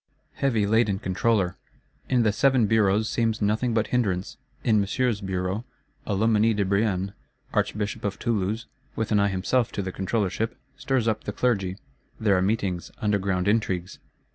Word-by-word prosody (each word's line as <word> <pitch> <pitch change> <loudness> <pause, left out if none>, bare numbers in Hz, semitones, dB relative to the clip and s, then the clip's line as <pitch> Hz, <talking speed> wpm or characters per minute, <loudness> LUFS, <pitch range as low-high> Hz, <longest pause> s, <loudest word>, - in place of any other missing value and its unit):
Heavy 115 -7 +1
laden 105 -1 +2
Controller! 95 -1 0 0.5
In 125 -2 +3
the 110 - +3
Seven 130 0 +3
Bureaus 105 0 +3
seems 115 -2 0
nothing 110 +4 +1
but 110 -1 +2
hindrance: 100 -7 -1 0.3
in 110 -2 +3
Monsieur's 110 +2 0
Bureau, 95 +2 -2 0.4
a 100 - 0
Loménie 110 +1 +3
de 100 -1 +1
Brienne, 100 -1 0 0.4
Archbishop 105 -1 -1
of 100 -1 -2
Toulouse, 110 0 -1 0.3
with 110 - -2
an 105 - +4
eye 100 - +3
himself 100 +6 0
to 100 - -2
the 95 - -4
Controllership, 105 +3 -1 0.2
stirs 130 -4 0
up 110 - -1
the - - -2
Clergy; 100 -5 0 0.4
there 105 -3 +3
are 90 - +2
meetings, 95 -3 -1
underground 100 -3 0
intrigues. 95 -4 0
105 Hz, 155 wpm, -25 LUFS, 95-115 Hz, 0.5 s, an